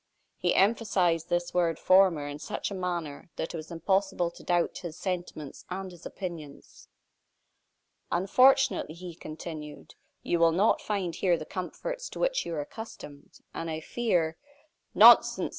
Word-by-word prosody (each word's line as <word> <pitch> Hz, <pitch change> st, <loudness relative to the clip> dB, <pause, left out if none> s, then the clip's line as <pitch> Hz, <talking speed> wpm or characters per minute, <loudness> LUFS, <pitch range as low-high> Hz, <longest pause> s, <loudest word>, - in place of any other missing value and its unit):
He -, -, +1 dB
emphasized 190 Hz, -6 st, +2 dB
this 175 Hz, 0 st, -1 dB
word 170 Hz, -3 st, +1 dB
"former" 185 Hz, -5 st, +4 dB
in 145 Hz, 0 st, -6 dB
such -, -, -4 dB
a -, -, -3 dB
manner 175 Hz, -6 st, -4 dB
that 160 Hz, -, -4 dB
it -, -, -5 dB
was 155 Hz, -1 st, -7 dB
impossible 185 Hz, +1 st, 0 dB
to -, -, -15 dB
doubt 175 Hz, -1 st, 0 dB
his 170 Hz, -3 st, -7 dB
sentiments 175 Hz, -6 st, -5 dB
and 190 Hz, +1 st, -5 dB
his 175 Hz, -2 st, -10 dB
opinions. 165 Hz, -6 st, -9 dB, 1.2 s
"Unfortunately," 255 Hz, -, +3 dB
he 175 Hz, 0 st, -8 dB
continued, 155 Hz, -1 st, -9 dB, 0.3 s
"you 170 Hz, -, 0 dB
will 165 Hz, -1 st, +5 dB
not 200 Hz, +6 st, +3 dB
find 195 Hz, -5 st, -2 dB
here 180 Hz, -3 st, +2 dB
the 155 Hz, -, -7 dB
comforts -, -, -5 dB
to -, -, -9 dB
which -, -, 0 dB
you 170 Hz, -, -3 dB
are 150 Hz, -, -2 dB
accustomed, 145 Hz, -5 st, -10 dB
and 165 Hz, -, -4 dB
I 160 Hz, 0 st, -3 dB
fear 170 Hz, -4 st, -1 dB, 0.3 s
" 315 Hz, +3 st, -45 dB
"Nonsense!" -, -, +7 dB
175 Hz, 155 wpm, -28 LUFS, 160-195 Hz, 1.2 s, Nonsense